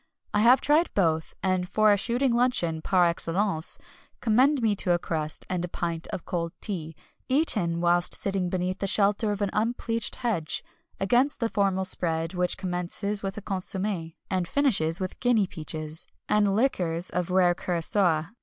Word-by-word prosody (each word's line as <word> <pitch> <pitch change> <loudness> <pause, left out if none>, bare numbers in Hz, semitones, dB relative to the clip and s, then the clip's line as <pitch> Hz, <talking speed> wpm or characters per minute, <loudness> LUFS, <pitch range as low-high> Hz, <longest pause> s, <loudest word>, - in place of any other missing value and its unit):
I 210 - +2
have 245 +4 +6
tried 310 +4 +2
both, 160 -4 0
and 185 -1 0
for 215 -1 +4
a - - +5
shooting 240 +5 +1
luncheon 235 -10 +1
par 180 +1 +3
excellence 170 0 -1 0.4
commend 260 +6 +3
me 220 -3 +1
to 180 - +1
a - - +3
crust 155 -3 -3
and 180 -2 -2
a - - -2
pint 170 -1 -3
of 175 - -6
cold 170 -2 -3
tea, 165 -7 -3 0.3
eaten 210 - +3
whilst 175 0 +3
sitting 195 -2 -1
beneath 185 +1 -2
the 195 - -1
shelter 205 +2 +3
of 205 0 -2
an 200 - -1
unpleached 230 0 -1
hedge, 215 -11 -2 0.4
against 245 +8 +2
the 230 -2 0
formal 195 -3 0
spread 165 -2 -1
which 180 -1 0
commences 190 +3 -2
with 195 +1 -4
a 210 - -7
consommé, 190 -3 -3
and 185 -3 -1
finishes 195 - +1
with 185 -1 -5
guinea 240 -5 +3
peaches, 155 -2 -5 0.2
and 205 -2 +2
liqueurs 180 -8 0
of 180 0 -2
rare 180 -1 +4
curaçoa. 175 -1 0
190 Hz, 165 wpm, -26 LUFS, 170-215 Hz, 0.4 s, have